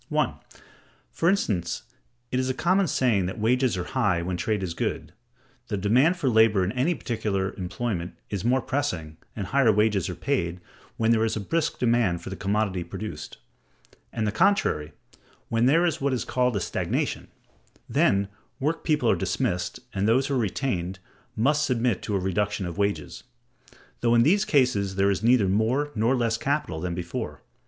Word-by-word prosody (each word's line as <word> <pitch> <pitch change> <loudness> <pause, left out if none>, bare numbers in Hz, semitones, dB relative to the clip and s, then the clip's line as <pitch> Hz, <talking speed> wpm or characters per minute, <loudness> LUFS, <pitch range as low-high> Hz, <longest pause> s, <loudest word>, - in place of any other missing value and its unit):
1. - - +1 0.8
For 165 - +1
instance, 95 - 0 0.5
it 130 - +1
is 130 0 0
a 130 - -1
common 185 +2 +2
saying 120 - +2
that 95 - -5
wages 120 0 +2
are 90 - -2
high 90 -7 0
when 90 +1 -2
trade 105 +2 -1
is 90 -3 -3
good. - - -3 0.5
The 105 -3 -2
demand 125 - +3
for 150 - -1
labor 110 -4 +4
in 90 - -1
any 135 +9 +1
particular 100 -7 -2
employment 90 -1 -4 0.2
is 100 -2 -3
more 125 +2 +2
pressing, 90 - -2 0.2
and 100 - -3
higher 135 +1 +3
wages 105 -3 +2
are 90 - -4
paid, 90 -4 -1 0.4
when 115 0 +2
there 110 -1 +3
is 110 - 0
a - - -2
brisk 160 - -1
demand 115 -8 +1
for - - -7
the - - -4
commodity 100 -2 -1
produced; 105 +5 -7 0.7
and 110 -2 -2
the 105 - 0
contrary 110 - +1 0.6
when 115 +1 +2
there 165 +6 +4
is 165 -2 -1
what 140 -1 +1
is 125 - -2
called 125 -2 +1
a - - +1
stagnation: - - -2 0.6
then 100 0 +2 0.3
work 150 +4 -1
people 150 -6 +1
are - - +4
dismissed, 90 -2 -2
and 100 +1 0
those 130 +4 +3
who 140 - -2
are 130 - +2
retained 95 -4 -2 0.4
must 145 +7 +2
submit 120 -6 0
to 105 - -2
a - - +2
reduction 100 +1 -1
of 85 -1 -5
wages; 100 0 -1 0.8
though 120 0 +3
in 115 - +6
these 200 - +3
cases 125 - +2
there 100 +1 +3
is 100 - -1
neither 115 -3 +4
more 115 +9 +1
nor 115 +4 +2
less 115 -2 0
capital 140 - -1
than 90 +1 -3
before. 85 -1 -5
110 Hz, 180 wpm, -26 LUFS, 95-130 Hz, 0.8 s, in